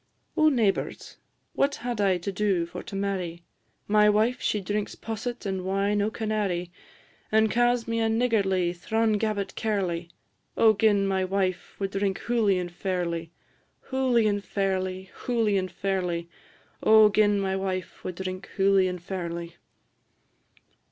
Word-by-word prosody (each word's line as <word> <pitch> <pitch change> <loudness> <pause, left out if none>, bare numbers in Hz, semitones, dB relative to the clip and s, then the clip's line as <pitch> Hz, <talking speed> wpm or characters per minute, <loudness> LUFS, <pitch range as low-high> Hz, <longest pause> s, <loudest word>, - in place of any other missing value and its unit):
Oh, 310 0 +5
neighbours! 225 -8 -1 0.4
what 280 +1 +1
had 240 -3 -3
I 190 -2 +3
to 180 +3 -4
do 195 -3 +1
for 170 - -7
to 195 - -9
marry? 185 -4 -3 0.4
My 210 0 +5
wife 220 +4 +2
she 210 - 0
drinks 205 +2 -3
posset 225 +2 -5
and 190 -2 -2
wine 200 +2 +1
o' 205 - +1
Canary; 210 -6 -2 0.6
And 220 0 +4
ca's 240 0 +2
me 230 0 -1
a 225 0 +2
niggardly, 200 -7 +1
thrawn 220 +4 0
gabbit 210 -2 -1
cairly. 180 -6 -2 0.5
O 220 -1 +6
gin 205 -1 +3
my 190 -1 +1
wife 185 -1 -1
wad 195 -1 -2
drink 195 -1 0
hooly 220 -5 +2
and 175 -1 -3
fairly! 175 -2 -2 0.6
Hooly 255 -4 +2
and 205 -1 +1
fairly, 190 -2 -2
hooly 225 -4 0
and 185 -2 -1
fairly; 180 -2 -2 0.5
O 220 0 +7
gin 205 0 +3
my 190 -1 0
wife 185 -2 -4
wad 180 - -4
drink 185 +1 -5
hooly 195 -1 +4
and 180 -1 -5
fairly! 170 -2 -5
195 Hz, 145 wpm, -26 LUFS, 185-215 Hz, 0.6 s, O